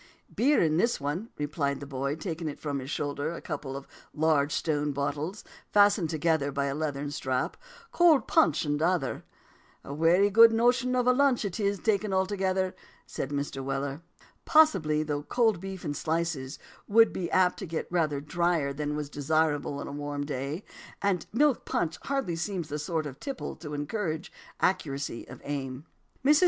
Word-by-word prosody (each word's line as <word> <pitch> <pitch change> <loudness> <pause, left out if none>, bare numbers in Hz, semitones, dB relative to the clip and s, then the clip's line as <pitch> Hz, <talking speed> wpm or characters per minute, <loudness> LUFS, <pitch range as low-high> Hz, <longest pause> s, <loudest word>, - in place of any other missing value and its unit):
"Beer 285 +5 +4
in 155 -1 +3
this 235 +7 +2
one," 150 +11 -3
replied 145 -1 -1
the 140 - -7
boy, 140 +1 -2
taking 160 -2 -4
from 145 -2 -3
his 130 +1 -7
shoulder 145 +2 -2
a - - -6
couple 140 -4 -5
of 140 - -10 0.3
large 150 -2 +2
stone 150 -1 0
bottles, 145 +7 -3 0.3
fastened 205 -4 +4
together 155 -2 +1
by 140 0 -1
a 140 - -1
leathern 145 -1 -3
strap, 130 -2 -1 0.4
"cold 320 -9 +5
punch 160 -1 +3
in 145 0 0
t'other." 165 -4 0 0.6
"And - - -8
a - - -3
wery 170 +7 +4
good 230 +2 +8
notion 245 +2 +2
of 250 -1 +2
a 250 - +5
lunch 265 -4 +3
it 195 +1 -4
is, 200 -1 +1
take 215 -1 +1
it 210 - -3
altogether," 190 -1 0 0.3
said 135 - -4
Mr. 140 -1 -3
Weller. 135 +2 -3 0.4
Possibly; 190 - +4
though 145 -1 -2
cold 220 +3 +1
beef 190 -2 -7
in 145 - -1
slices 160 -3 -2 0.3
would 225 +2 +5
be 175 -2 -3
apt 185 -1 +3
to 195 - -5
get 165 0 -3
rather 155 -5 +1
dryer 160 -1 0
than 150 +1 -3
was 150 -1 -3
desirable 145 0 0
on - - -5
a - - -6
warm 145 0 -4
day. 145 +5 -4 0.4
And 195 -4 +1
milk 285 +3 +3
punch 165 -1 -1
hardly 270 -12 -1
seems 175 -2 -3
the 150 - -3
sort 155 +1 -2
of 140 -1 -7
tipple 275 -3 -5
to 150 -3 -6
encourage 160 +2 -3 0.3
accuracy 145 -9 -1
of - - -11
aim. 135 -1 -4 0.4
Mrs. 295 +2 +6
160 Hz, 175 wpm, -28 LUFS, 145-195 Hz, 0.6 s, good